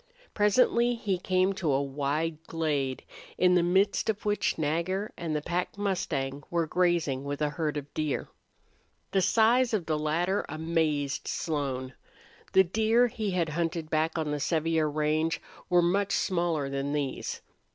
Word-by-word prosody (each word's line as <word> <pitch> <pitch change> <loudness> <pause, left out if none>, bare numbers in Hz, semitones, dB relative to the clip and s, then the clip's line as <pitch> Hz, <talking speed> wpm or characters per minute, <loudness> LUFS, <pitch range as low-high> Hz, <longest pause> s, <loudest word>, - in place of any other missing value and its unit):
Presently 235 +3 +3
he 200 -5 -1
came 185 +1 +2
to 170 -6 -1
a 135 - +2
wide 145 +3 -2
glade 145 -5 -1 0.3
in 180 0 +4
the 180 - +5
midst 190 +5 +2
of 215 -1 -2
which 205 0 +1
Nagger 170 +6 -1
and 165 -3 -3
the 150 - -2
pack 175 +3 -2
mustang 145 -9 -2
were 170 -1 +1
grazing 165 -6 +1
with 145 0 -4
a 150 -1 0
herd 150 -2 -2
of 145 0 -7
deer. 155 -3 -2 0.8
The 195 - +2
size 230 +5 +4
of 185 -6 -2
the 155 -1 0
latter 170 +6 0
amazed 155 -3 -1
Slone. 135 -5 -2 0.6
The 190 - +7
deer 220 +6 +3
he 220 -3 -2
had 175 -4 0
hunted 165 0 -2
back 160 +1 +1
on 155 -2 -1
the 150 - -1
Sevier 160 0 +1
range 155 +2 0 0.3
were 175 -1 +4
much 195 +3 +1
smaller 170 -5 0
than 140 +1 -2
these. 145 -3 -3
165 Hz, 155 wpm, -28 LUFS, 150-185 Hz, 0.8 s, The